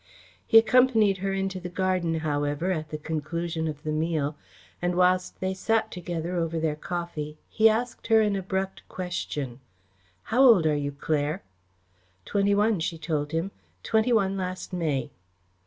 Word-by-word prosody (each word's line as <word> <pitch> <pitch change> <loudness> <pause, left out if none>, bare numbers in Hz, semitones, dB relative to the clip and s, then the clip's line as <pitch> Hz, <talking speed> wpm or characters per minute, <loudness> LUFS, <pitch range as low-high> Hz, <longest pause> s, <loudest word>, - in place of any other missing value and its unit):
He 225 - +7
accompanied 225 -3 +5
her 195 +1 -1
into 195 -1 -2
the 180 0 -6
garden, 180 -2 0
however, 145 +3 -1
at 155 -4 -3
the 155 - -4
conclusion 160 +2 -3
of 150 -1 -6
the 155 - -2
meal, 155 -2 -1 0.5
and 175 0 0
whilst 180 0 +2
they 190 0 -1
sat 225 +4 0
together 175 -1 -4
over 165 -1 -1
their 160 -2 0
coffee 155 -2 -5
he 220 0 +4
asked 235 +3 -2
her 225 -1 +6
an 210 -2 +2
abrupt 190 0 -3
question. 150 -8 -4 0.7
"How 250 - +5
old 230 -11 +7
are 155 - +3
you, 145 -1 -2
Claire?" 150 +4 -1 0.8
"Twenty 200 0 +2
one," 210 -1 +2
she 165 +1 -2
told 150 -2 -2
him, 165 +4 -1 0.3
"twenty 220 +3 +2
one 195 -4 +2
last 185 0 -4
May." 150 -8 -1
175 Hz, 155 wpm, -26 LUFS, 155-195 Hz, 0.8 s, He